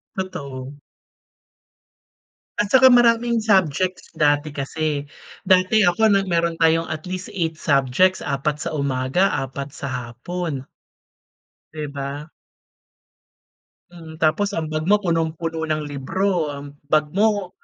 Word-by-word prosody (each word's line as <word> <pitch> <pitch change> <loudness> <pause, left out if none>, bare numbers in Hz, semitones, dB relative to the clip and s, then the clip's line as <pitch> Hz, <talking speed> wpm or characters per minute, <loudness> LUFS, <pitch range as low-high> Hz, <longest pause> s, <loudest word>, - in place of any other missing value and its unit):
Totoo. 140 -8 -6 1.8
At 210 - +2
tsaka 260 0 +8
maraming 235 -1 +4
subjects 185 -4 +1
dati 145 0 +2
kasi. 145 +1 -3 0.4
Dati 185 +2 +4
ako, 215 +5 +3
na 200 - +4
meron 170 -2 0
tayong 165 0 +3
at 155 +1 -5
least 185 0 -5
8 165 -3 -2
subjects, 140 +7 +2
4 145 +2 -2
sa - - -3
umaga 140 +6 +1
4 135 +1 -4
sa 140 - -7
hapon 135 +4 -5 1.1
di 150 -1 -4
ba? 140 +1 -6 1.6
Mm, 165 -2 -12
tapos 200 +6 +2
ang 160 -3 -3
bag 155 +1 -2
mo, 210 +1 +3
punong-puno 165 -2 -1
ng 155 -1 -1
libro. 155 +5 -1
Ang 140 0 -10
bag 150 0 +2
mo, 205 -1 +1
160 Hz, 120 wpm, -22 LUFS, 145-185 Hz, 1.8 s, tsaka